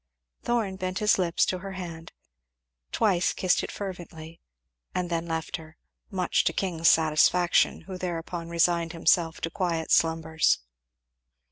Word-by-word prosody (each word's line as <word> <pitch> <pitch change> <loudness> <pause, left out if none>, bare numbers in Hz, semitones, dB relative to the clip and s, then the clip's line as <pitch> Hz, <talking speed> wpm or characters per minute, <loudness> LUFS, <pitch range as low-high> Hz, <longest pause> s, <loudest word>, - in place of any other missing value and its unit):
Thorn 220 -6 -1
bent 185 -1 -3
his 210 -1 +3
lips 170 -2 +2
to 185 - -2
her 195 +1 -7
hand, 170 -3 -7 0.8
twice 190 -5 +2
kissed 185 -1 +1
it - - -5
fervently, 170 -4 -8 0.5
and 180 -1 -2
then 170 0 -1
left 160 0 -3
her; 160 -1 -14 0.3
much 185 -4 +1
to - - +1
King's 165 -4 +2
satisfaction, 160 +2 +3
who 185 -1 -8
thereupon 170 -1 -4
resigned 170 0 +1
himself 165 0 +2
to 165 - -3
quiet 170 -4 -2
slumbers. 160 0 +3
170 Hz, 135 wpm, -27 LUFS, 165-185 Hz, 0.8 s, his